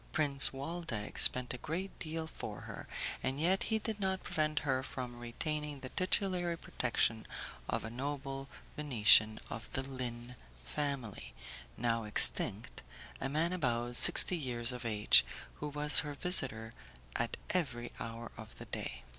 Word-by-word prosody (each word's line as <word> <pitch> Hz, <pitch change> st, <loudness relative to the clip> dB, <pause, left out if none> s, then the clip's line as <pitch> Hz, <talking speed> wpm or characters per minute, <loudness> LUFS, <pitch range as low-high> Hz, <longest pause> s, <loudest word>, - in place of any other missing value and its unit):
Prince 140 Hz, -3 st, +5 dB
Waldeck 135 Hz, -6 st, -5 dB
spent 125 Hz, -1 st, +8 dB
a 125 Hz, -, -7 dB
great 180 Hz, +8 st, -5 dB
deal 160 Hz, 0 st, -4 dB
for 160 Hz, -, -7 dB
her, -, -, -9 dB, 0.3 s
and 135 Hz, +2 st, -2 dB
yet 180 Hz, +5 st, +2 dB
he 220 Hz, -, +3 dB
did 220 Hz, -1 st, -4 dB
not 190 Hz, -1 st, -1 dB
prevent 155 Hz, -1 st, -1 dB
her 130 Hz, -2 st, +1 dB
from 125 Hz, -2 st, -6 dB
retaining 150 Hz, +4 st, -4 dB
the 130 Hz, -, -8 dB
titulary 185 Hz, -2 st, 0 dB
protection 115 Hz, -6 st, 0 dB, 0.4 s
of -, -, -1 dB
a 115 Hz, -, -6 dB
noble 135 Hz, +1 st, -5 dB, 0.3 s
Venetian 110 Hz, -6 st, +6 dB
of 115 Hz, -, -7 dB
the 130 Hz, -, -1 dB
Lin 125 Hz, -2 st, -5 dB, 0.3 s
family, 140 Hz, -8 st, -4 dB, 0.4 s
now 115 Hz, -1 st, 0 dB
extinct, 105 Hz, +1 st, +1 dB, 0.4 s
a 135 Hz, -, -2 dB
man 160 Hz, +5 st, +1 dB
about 120 Hz, -7 st, -1 dB
sixty 180 Hz, -, +4 dB
years 125 Hz, -6 st, -2 dB
of 125 Hz, -1 st, -7 dB
age, 105 Hz, -2 st, +5 dB, 0.3 s
who 150 Hz, -, -4 dB
was 150 Hz, 0 st, +3 dB
her 145 Hz, -2 st, -4 dB
visitor 125 Hz, -10 st, 0 dB, 0.4 s
at -, -, -1 dB
every 125 Hz, -10 st, -2 dB
hour 115 Hz, 0 st, -6 dB
of -, -, -11 dB
the -, -, -9 dB
day. 60 Hz, 0 st, -5 dB
135 Hz, 145 wpm, -34 LUFS, 120-155 Hz, 0.4 s, spent